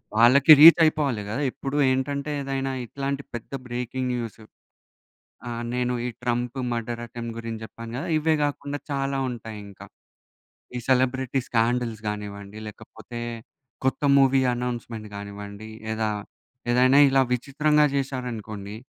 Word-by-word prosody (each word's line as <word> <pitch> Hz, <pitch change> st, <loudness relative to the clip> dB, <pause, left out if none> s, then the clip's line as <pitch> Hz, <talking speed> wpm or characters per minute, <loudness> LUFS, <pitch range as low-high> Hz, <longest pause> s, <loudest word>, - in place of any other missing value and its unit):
వాళ్ళకి 130 Hz, +7 st, +6 dB
రీచ్ 165 Hz, +2 st, +10 dB
అయిపోవాలి 145 Hz, -8 st, +1 dB
గద. 120 Hz, +7 st, -2 dB
ఎప్పుడు 140 Hz, +1 st, -4 dB
ఏంటంటే 140 Hz, +3 st, -1 dB
ఏదైనా 135 Hz, 0 st, -2 dB
ఇట్లాంటి 140 Hz, +2 st, -4 dB
పెద్ద 120 Hz, +2 st, -7 dB, 0.2 s
బ్రేకింగ్ 125 Hz, +1 st, -3 dB
న్యూస్. 115 Hz, -2 st, -5 dB, 1.1 s
ఆ! -, -, -4 dB, 0.2 s
నేను 125 Hz, 0 st, 0 dB
ఈ -, -, -1 dB
ట్రంప్ 120 Hz, +1 st, -1 dB
మర్డర్ 120 Hz, 0 st, -3 dB
అటెంప్ట్ 115 Hz, -1 st, -7 dB
గురించి 115 Hz, -1 st, -6 dB
చెప్పాను 115 Hz, +1 st, -9 dB
గద. 135 Hz, -, -3 dB
ఇవే 160 Hz, +1 st, +2 dB
కాకుండా 145 Hz, 0 st, -3 dB
చాలా 135 Hz, 0 st, -1 dB
ఉంటాయి 110 Hz, -3 st, -7 dB
ఇంకా. 100 Hz, -, -12 dB, 0.9 s
ఈ -, -, -1 dB
సెలబ్రిటీ 130 Hz, 0 st, +2 dB
స్కాండల్స్ 115 Hz, -1 st, 0 dB
కానివ్వండి 105 Hz, 0 st, -6 dB
లేకపోతే, 110 Hz, +2 st, -10 dB, 0.6 s
కొత్త 130 Hz, -, 0 dB, 0.2 s
మూవీ 135 Hz, 0 st, +5 dB, 0.2 s
అనౌన్స్‌మెంట్ 120 Hz, -3 st, -4 dB
కానివ్వండి 100 Hz, +1 st, -8 dB, 0.2 s
లేదా, 110 Hz, 0 st, -1 dB, 0.6 s
ఏదైనా 130 Hz, +3 st, +5 dB
ఇలా 135 Hz, 0 st, +4 dB
విచిత్రంగా 150 Hz, +4 st, +2 dB
చేశారనుకోండి. 115 Hz, -7 st, -4 dB
125 Hz, 125 wpm, -25 LUFS, 115-135 Hz, 1.1 s, రీచ్